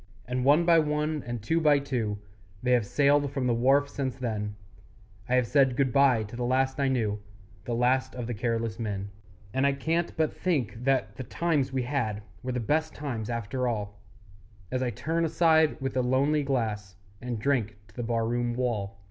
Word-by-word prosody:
And 125 0 -2
one 150 +5 +5
by 165 -1 +6
one, 150 0 0
and 120 -3 -4
two 165 +9 +1
by 150 -2 +5
two, 125 -7 -2 0.5
They 125 - +1
have 120 -4 +3
sailed 145 +2 +3
from 135 -2 -2
the 120 - +2
wharf 135 +5 +3
since 135 -2 -3
then; 110 -5 -3 0.7
I 125 - +3
have 125 -1 +3
said 135 0 +3
good 130 -3 +1
bye 135 -5 +4
to 105 +2 -9
the 120 - -3
last 130 +2 +1
I 140 - +2
knew, 110 -6 0 0.5
The 120 - -2
last 125 +2 +1
of 125 -2 -4
the 120 - -3
careless 115 0 -2
men. 100 -3 -3 0.4
And 130 - +1
I 140 - +2
can't 165 +5 -1
but 160 -1 +1
think 125 - -2
that 135 -1 +1
the 130 - -4
times 145 -2 0
we 130 -1 -1
had 115 -6 -2 0.2
Were 130 0 -3
the 125 - -1
best 155 +7 0
times 120 -7 -4
after 120 +2 -2
all, 105 -3 -3 0.7
As 130 - -1
I 125 - 0
turn 160 +9 -1
aside 160 -1 +3
with 135 -1 -3
a 130 - +3
lonely 135 +4 +2
glass 110 -8 -2 0.3
And 125 -2 -3
drink 110 -4 0
to - - -21
the 120 - -4
bar 115 -1 0
room 120 0 -1
wall. 105 -6 -2
125 Hz, 200 wpm, -28 LUFS, 115-140 Hz, 0.7 s, by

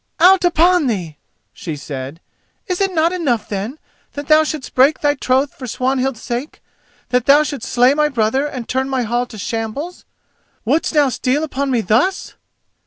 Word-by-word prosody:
"Out 370 +1 +6
upon 350 -2 +3
thee!" 175 -10 -3 0.4
she 160 -4 -6
said; 140 +2 -7 0.4
"is 365 -3 -3
it 390 -1 +1
not 335 0 +1
enough, 265 -12 -1
then, 210 +8 -4 0.4
that 285 0 -7
thou 310 0 +6
shouldst 305 -3 -5
break 275 +4 +4
thy 290 -1 +3
troth 265 0 0
for 255 - -9
Swanhild's 260 0 -1
sake, 245 +5 -5 0.5
that 250 0 0
thou 290 +2 +6
shouldst 285 -6 -5
slay 250 +2 +4
my 300 0 +2
brother 260 +2 0
and 255 -5 -7
turn 265 +1 -1
my 260 -2 0
hall 240 +2 -1
to 225 - -11
shambles? 225 - -5 0.6
Wouldst 300 +7 0
now 290 -2 +4
steal 260 +4 -1
upon 280 -2 -2
me 245 -3 +1
thus!" 240 - 0
265 Hz, 175 wpm, -18 LUFS, 235-300 Hz, 0.6 s, Out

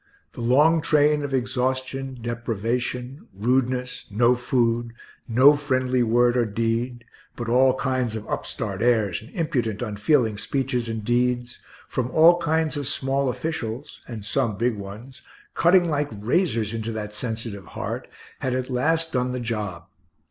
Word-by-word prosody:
the 120 - -7
long 150 +7 +4
train 150 -1 +3
of 140 - -4
exhaustion, 130 +1 -1
deprivation, 120 +3 -3
rudeness, 125 +3 0
no 120 +4 +4
food, 120 -1 0 0.3
no 130 +6 +6
friendly 130 -3 0
word 120 +1 +3
or 125 - +3
deed, 115 +3 -1 0.3
but 120 - -5
all 130 +2 +4
kinds 130 -3 -1
of 110 - -6
upstart - - -3
airs 110 -6 +2
and 110 - -13
impudent, 125 - -1
unfeeling 110 0 +1
speeches 125 -3 -1
and 110 -2 -4
deeds, 120 0 0 0.3
from 125 -1 -2
all 165 +5 +6
kinds 160 -1 0
of 145 -3 -2
small 135 0 +1
officials 125 -3 -4
(and 110 -4 -7
some 115 -2 0
big 120 +1 +1
ones), 105 +6 -9 0.3
cutting 175 +1 +4
like 150 -2 0
razors 115 - 0
into 115 0 -3
that 105 -1 -5
sensitive 110 -3 -5
heart, - - -4 0.3
had 130 -1 -1
at 130 +1 -3
last 160 +6 +1
done 125 -1 0
the 125 - -2
job. 105 -7 -4
125 Hz, 145 wpm, -24 LUFS, 115-135 Hz, 0.3 s, no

